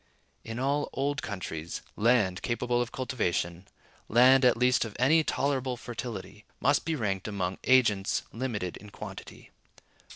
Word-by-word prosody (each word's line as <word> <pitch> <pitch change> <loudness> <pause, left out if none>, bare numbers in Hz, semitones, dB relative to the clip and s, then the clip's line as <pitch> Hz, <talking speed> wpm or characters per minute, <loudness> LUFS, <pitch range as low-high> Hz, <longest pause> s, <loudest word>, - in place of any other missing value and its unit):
In 115 0 -6
all 140 +3 0
old 140 +1 -1
countries, 85 -5 -5
land 105 -5 +2
capable 120 0 0
of 120 +1 -3
cultivation, 95 -8 -2 0.4
land 130 +4 +6
at 125 -2 +5
least 125 +1 +3
of 110 -3 -7
any 155 +6 +4
tolerable 130 -4 -1
fertility, 115 -4 -7 0.2
must 140 +2 +2
be 165 - 0
ranked 100 -7 -2
among 95 -3 -3
agents 110 -7 +3
limited 110 -7 -3
in 105 - -12
quantity. - - -10
120 Hz, 135 wpm, -29 LUFS, 100-130 Hz, 0.4 s, land